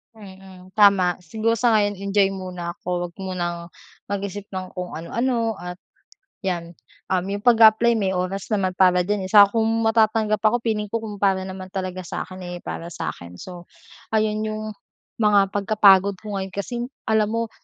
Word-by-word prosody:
Mm, 190 -2 -14
tama 195 -4 +5
siguro 220 +7 0
sa 235 +1 +2
ngayon 205 -2 +2
enjoy 200 0 +2
muna 180 -2 -6
ako 175 0 -3
huwag 170 - -18
munang 175 -3 -4 0.4
mag-isip 200 0 -4
ng 185 -1 -5
kung 180 -1 -5
ano-ano 230 +6 -1
at 180 0 -8 0.7
yan, 170 -2 -3 0.3
um, 185 -1 0
yung 200 +1 -4
pag-a-apply 230 0 +5
may 195 -3 0
oras 185 +1 -2
naman 195 -3 +1
para 180 -1 +5
diyan, 200 +1 -1
eh, - - -6
saka 205 -1 +9
kung 220 - +3 0.2
matatanggap 220 -1 +2
ako 240 +2 +3
feeling 215 -2 -1
ko 225 +2 -3
kung 210 -2 -7
para 195 -1 +2
naman 190 0 -7
talaga 185 -1 -4
sa - - -4
akin, 185 - -8
eh, 175 0 -7
para 170 +1 -6
sa - - -3
akin 85 0 -10
so, 175 - -10 0.5
ayun 215 0 +1
yung 215 0 -4 0.5
mga 205 -3 +4
pagka-pagod 200 -1 +4
ko 210 -2 -5
ngayon 190 -1 -5
kasi 240 +4 -4 0.2
alam 215 0 +2
mo, 230 0 -1
195 Hz, 175 wpm, -23 LUFS, 185-215 Hz, 0.7 s, saka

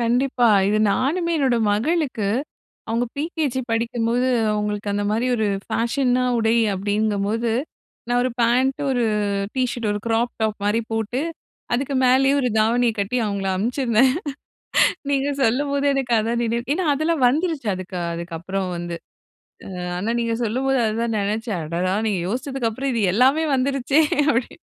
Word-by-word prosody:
கண்டிப்பா. 245 +1 +2 0.2
இது 210 +1 +2
நானுமே 335 - 0
என்னோட 265 -4 +2 0.2
மகளுக்கு 250 -2 0 0.6
அவங்க 230 +2 0
பிரிகேஜி 295 -3 -2
படிக்கும்போது 235 +2 0 0.2
அவங்களுக்கு 210 0 -2
அந்த 205 0 -1
மாரி 225 +4 0
ஒரு 220 -2 0 0.2
ஃபேஷனா 250 +1 +1
உடை 225 0 +2 0.2
அப்டிங்கும்போது 210 +3 0 0.6
நான் 245 0 +2
1 255 - 0
பாண்ட் 250 +3 +2
1 245 -2 +1 0.5
ட் - - -4
ஷர்ட் 235 -3 -3
1 205 - -2
கிராப் 230 +1 +1
டாப் 215 -1 0
மாரி 210 +3 +2
போட்டு 225 +3 -1 0.5
அதுக்கு 270 +3 -1
மேலேயே 265 +2 +4
1 255 -3 +1
தாவணிய 230 +2 +3
கட்டி 200 +4 -1
அவங்கள 200 -1 -2
அனுப்பிச்சிருந்தேன். 240 +3 +2 1.0
நீங்க 280 0 +1
சொல்லும்போது 280 +4 +1
எனக்கு 265 -3 -1
அதான் 230 +2 0
நினைவு 235 +1 -1
ஏனா, 365 +4 -1
அதெல்லாம் 310 -1 +1
வந்துருச்சு 305 -2 -1
அதுக்கு 185 0 -7 0.2
அதுக்கப்புறம் 170 +3 -4
வந்து. 170 0 -4 0.8
அ - - -5 0.2
ஆனா, 210 +6 -1
நீங்க 230 -1 0
சொல்லும்போது 260 +4 0
அத 215 0 -1
தான் 230 -1 -1
ணெனைச்சேன் 210 0 -2
அடடா, 175 +4 -1
நீங்க 195 -5 0
யோசிச்சதுக்கு 255 +1 -2
அப்புறம் 270 +4 -2
இது 230 - 0
எல்லாமே 265 +8 +4
வந்துருச்சே 275 +2 +2 0.3
அப்டி 240 -1 -2
235 Hz, 145 wpm, -22 LUFS, 215-265 Hz, 1.0 s, மேலேயே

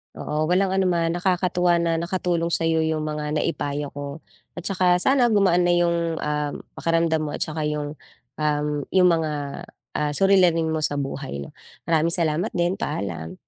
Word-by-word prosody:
Oo, 155 +1 -2
walang 185 +3 +2
ano 190 0 +1
naman. 170 -2 +1
Nakakatuwa 180 0 +1
na 165 -1 +1
nakatulong 170 -1 -1
sa'yo 165 -1 +1
yung 155 -1 -1
mga 150 0 -3
naipayo 145 -2 -2
ko, 145 +2 -7 0.3
at 175 - -7
saka 185 -2 +2
sana 265 -2 +4
gumaan 190 -6 +3
na 175 - +4
yung, 170 -1 +1
ah, 150 -1 -1 0.2
pakiramdam 165 -1 +1
mo, 155 -1 -3
at - - -3
saka 155 -1 -2
yung, 150 -1 -3 0.4
um, 150 -1 0 0.3
yung 185 -1 +6
mga, 160 -2 +1 0.7
ah, 150 -1 0
suliranin 180 -3 +4
mo 160 - 0
sa 150 -1 -1
buhay, 135 - -4
'no? 70 - -9 0.3
Maraming 165 0 +1
salamat 165 +3 0
din, 175 +2 0
paalam. 85 -5 -4
165 Hz, 165 wpm, -23 LUFS, 150-175 Hz, 0.7 s, yung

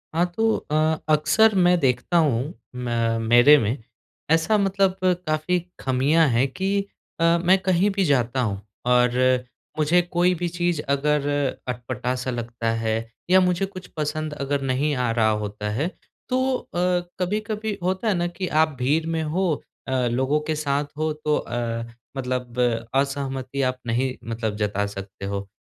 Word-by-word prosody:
हाँ, 170 - +3
तो 225 0 +3 0.2
अ, - - +1 0.4
अक्सर 155 +9 +4
मैं 180 0 +5
देखता 130 +4 +1
हूँ 145 -1 +1 0.2
मै 125 -1 -3 0.3
मेरे 120 +6 +7
में 115 0 0 0.5
ऐसा 165 +7 +3
मतलब 195 -1 +2 0.3
काफ़ी 155 +4 +1 0.2
खामियाँ 140 +5 +3
हैं 125 +3 +2
कि 190 +8 -2 0.5
अ, - - +1 0.2
मैं 185 +2 +5
कहीं 185 +2 +3
भी 195 - +2
जाता 130 -3 +1
हूँ 100 -4 -2 0.2
और 125 0 +3 0.6
मुझे 160 +4 +4
कोई 175 +1 +1
भी 175 +1 -2
चीज़ 175 -2 -1
अगर 145 +1 +1 0.4
अटपटा-सा 125 +1 -3
लगता 120 -1 -3
है 110 0 +1 0.3
या 185 +1 +7
मुझे 180 +1 +1
कुछ 185 -2 -10
पसंद 155 0 -2
अगर 140 -1 -2
नहीं 135 +3 0
आ 125 -2 0
रहा 115 -1 +2
होता 105 0 -4
है। 135 +10 0 0.4
तो 255 0 +1
अ, - - -14 0.5
कभी-कभी 210 +3 -2
होता 190 +5 -1
है 215 - +3
ना 175 -1 0
कि 180 +2 -4 0.2
आप 155 -2 -3
भीड़ 145 +6 +1
में 165 -1 -1
हो 175 +4 0 0.4
अ, - - -3 0.2
लोगों 130 +5 +1
के - - 0
साथ 145 -1 0
हो 155 0 0
तो 150 0 0
अ, 115 -1 -3 0.3
मतलब 125 -2 -3 0.4
असहमति 135 -1 -1
आप 130 - -15
नहीं 125 +3 0 0.2
मतलब 110 -2 -2
जता 105 -1 0
सकते 100 -1 -7
हो। 100 0 -4
145 Hz, 155 wpm, -24 LUFS, 125-175 Hz, 0.6 s, मेरे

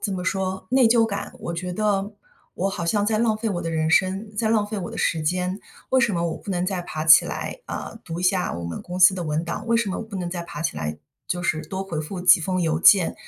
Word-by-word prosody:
怎 200 - -1
么 180 - -4
说 190 0 -2
内 260 -1 +5
疚 230 0 +4
感。 200 -2 -5
我 170 - -4
觉 180 +1 -4
得， 205 +1 0 0.4
我 195 - -1
好 180 -4 -4
像 205 +3 +1
在 215 -1 +1
浪 225 -2 +2
费 220 +1 -2
我 175 -3 -3
的 165 - -3
人 160 0 0
生， 195 +4 +1
在 220 +1 +1
浪 215 -2 +2
费 210 -1 -4
我 175 - -5
的 - - -7
时 160 - 0
间。 180 +4 -1 0.3
为 260 - +4
什 245 -7 +2
么 170 - -1
我 - - -5
不 200 - -8
能 180 -1 0
再 190 -1 -2
爬 155 -2 -5
起 160 - +8
来， - - -5
啊， 225 - -6
读 165 +1 -5
一 - - -4
下 180 0 +1
我 85 - -5
们 85 0 -5
公 180 +1 -6
司 185 +1 +8
的 180 - -4
文 155 +1 -1
档？ 205 +6 -5
为 235 - +1
什 220 -4 0
么 - - -3
不 220 -3 -8
能 175 -2 -3
再 175 -1 -4
爬 150 -2 -7
起 80 - -2
来， 75 0 -3 0.3
就 175 0 -2
是 155 -2 0
多 190 0 -4
回 170 -5 -4
复 180 +4 -6
几 180 -1 +7
封 185 +3 -1
邮 160 0 0
件？ 185 -1 +6
185 Hz, 295 characters per minute, -23 LUFS, 170-205 Hz, 0.4 s, 起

